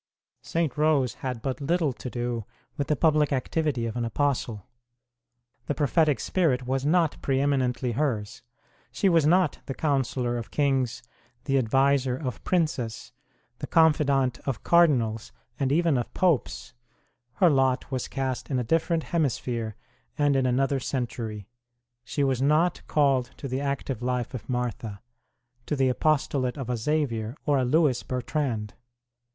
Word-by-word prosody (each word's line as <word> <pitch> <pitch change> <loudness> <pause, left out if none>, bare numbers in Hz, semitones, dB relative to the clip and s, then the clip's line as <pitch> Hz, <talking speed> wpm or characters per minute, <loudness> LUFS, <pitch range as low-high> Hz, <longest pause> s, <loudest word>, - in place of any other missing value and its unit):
St. 165 -5 -1
Rose 150 -5 +3
had 125 -4 -4
but 135 +1 -3
little 160 -1 +1
to 125 +3 -7
do 120 -2 -3 0.3
with 140 - -2
the 150 - +2
public 150 0 +3
activity 135 -1 -1
of 115 - -4
an 120 - -1
apostle; 115 -4 -1 1.0
the 145 - -1
prophetic 150 0 +2
spirit 140 -9 +1
was 130 +1 -1
not 165 +1 +2
pre 135 -1 +1
eminently 130 -3 0
hers; 120 -3 -2 0.5
she 200 - +1
was 165 -5 +4
not 180 -2 +3
the 135 - -4
counsellor 130 -4 0
of 115 -1 -8
Kings, 135 -4 0 0.4
the 135 - 0
adviser 135 +1 +2
of 130 -6 -5
Princes, 155 -10 -1 0.5
the - - -5
confidant 140 -5 +3
of 130 -5 -2
Cardinals, 125 -11 +3 0.3
and 135 -2 +1
even 160 -3 +3
of 120 - -4
Popes; 165 -8 0 0.6
her 175 +5 +4
lot 135 -1 +1
was 130 -2 -2
cast 130 -2 -3
in 135 - 0
a 125 - 0
different 165 +5 +1
hemisphere 120 -8 -1 0.4
and 145 -1 +3
in 130 -1 +2
another 135 +2 +1
century; 115 -6 -4 0.6
she 140 +4 -2
was 130 -2 +1
not 155 +5 +2
called 135 -4 +2
to 140 - -6
the 130 +1 -2
active 140 -3 -3
life 125 0 -2
of 125 -2 -7
Martha, 120 -4 -3 0.7
to 150 - 0
the 135 -2 +2
apostolate 135 -1 0
of 130 -3 -4
a - - 0
Xavier 115 -3 -1
or 145 -2 +3
a - - +1
Lewis 140 -1 +2
Bertrand. 125 -4 -2
135 Hz, 150 wpm, -26 LUFS, 125-150 Hz, 1.0 s, was